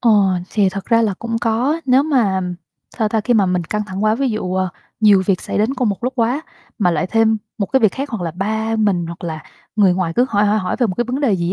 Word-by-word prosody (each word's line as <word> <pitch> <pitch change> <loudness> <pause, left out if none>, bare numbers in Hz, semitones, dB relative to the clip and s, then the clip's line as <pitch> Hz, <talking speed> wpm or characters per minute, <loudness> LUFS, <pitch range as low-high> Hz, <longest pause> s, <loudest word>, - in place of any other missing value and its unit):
Ờ, 235 - +3 0.4
thì 205 -3 +2
thật 190 +1 -5
ra 230 +1 +3
là 210 -4 0
cũng 230 0 -3
có, 250 +8 0
nếu 260 +1 +5
mà, 255 -10 +2
ừm, 180 -1 -2 0.4
sao 220 - +2
ta, 220 +1 0
khi 240 +3 +1
mà 205 -4 +4
mình 180 -2 0
căng 210 +5 -2
thẳng 195 +1 -3
quá, 215 +1 +3
ví 270 +2 0
dụ, 185 -4 -3
ờ, 185 0 0 0.3
nhiều 205 -3 +5
việc 190 -3 +1
xảy - - -3
đến 220 +6 +1
cùng 250 -3 0
một 200 +3 -3
lúc 255 - 0
quá, 245 +5 +1 0.4
mà 185 -5 +3
lại 160 -1 0
thêm 220 +2 +2 0.2
một 200 - 0
cái 265 +7 +2
việc 215 -4 +4
khác, 275 +2 -5
hoặc 215 -7 -3
là 165 - -2
ba 220 +5 -2
mình 200 -6 +1
hoặc 170 +1 -8
là 160 -2 -5 0.3
người 195 -4 +4
ngoài 180 -3 -1
cứ 250 +2 +4
hỏi 205 -1 +2
hỏi 210 +1 +2
hỏi 185 -3 -2
về 245 - +3
một 185 - -3
cái 240 - 0
vấn 250 +4 -3
đề 270 -7 +2
gì 170 0 -1
215 Hz, 280 wpm, -18 LUFS, 185-235 Hz, 0.4 s, nếu